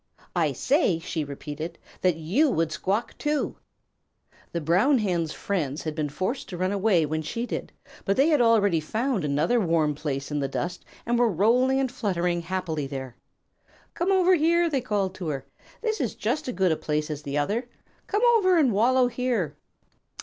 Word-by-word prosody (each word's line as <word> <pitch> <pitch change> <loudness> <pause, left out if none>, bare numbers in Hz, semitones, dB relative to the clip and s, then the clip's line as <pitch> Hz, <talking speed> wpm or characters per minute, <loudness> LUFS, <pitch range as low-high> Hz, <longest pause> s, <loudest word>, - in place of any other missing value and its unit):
"I - - +2
say," 270 - +2
she 165 -1 -3
repeated, 150 +3 -6 0.2
"that 180 -3 +3
you 190 - +2
would 165 -8 0
squawk 195 +8 -2
too!" 295 -1 -1 0.9
The 170 - -2
Brown 185 - +3
Hen's 175 -7 0
friends 155 -8 -2
had 155 - -3
been 150 -1 -2
forced 185 - -3
to 180 - -6
run 185 +2 0
away 195 -5 +2
when 155 +1 -2
she 230 +10 -3
did, - - -5 0.3
but 195 - 0
they 275 +3 +5
had 300 -5 +4
already 205 -7 +4
found 220 - -1
another 150 +11 +2
warm 165 -6 +2
place 140 -1 -4
in 145 - -1
the 140 - 0
dust 175 +6 -4 0.2
and 240 +1 +1
were 240 -1 +4
rolling 245 +8 +3
and 265 -2 0
fluttering 180 -8 -1
happily 165 -4 -3
there. 130 -3 -6 0.8
"Come 355 +3 0
over 370 -1 +4
here," 340 0 +3
they 275 -3 +1
called 205 -6 -1
to 185 -3 -6
her. 135 -3 -3 0.4
"This 440 -5 0
is 240 - -2
just 260 +8 -2
as 250 - -3
good 185 -1 +2
a - - +2
place 150 0 -2
as 150 -1 -5
the 140 0 -3
other. 215 - -1 0.4
Come 415 +3 0
over 370 -4 +3
and 270 -8 +3
wallow 250 +5 +4
here." 240 - -1
190 Hz, 185 wpm, -26 LUFS, 155-250 Hz, 0.9 s, they